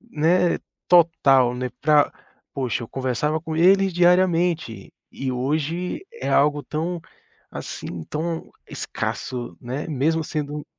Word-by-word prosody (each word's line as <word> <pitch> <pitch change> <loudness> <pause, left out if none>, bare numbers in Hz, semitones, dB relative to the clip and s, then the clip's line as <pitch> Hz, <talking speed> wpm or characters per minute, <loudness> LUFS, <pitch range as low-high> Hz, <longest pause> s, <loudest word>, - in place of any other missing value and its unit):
né, 175 -4 +1 0.3
total, 140 -8 +5
né, 125 0 -3
pra 150 -1 +4 0.4
poxa, 125 -4 -2
eu - - -13
conversava 135 +4 -1
com 160 0 -5
eles 195 +3 +5
diariamente 175 - +2 0.2
e 135 -1 -3
hoje 155 - -2
é 465 - -5
algo 145 0 +3
tão, 165 +6 -3 0.5
assim, 85 -2 -6
tão 165 +2 -3 0.2
escasso, 125 -2 -4
né, 130 +6 -4
mesmo 160 +2 +1
sendo 150 -1 -4
155 Hz, 115 wpm, -23 LUFS, 135-170 Hz, 0.5 s, total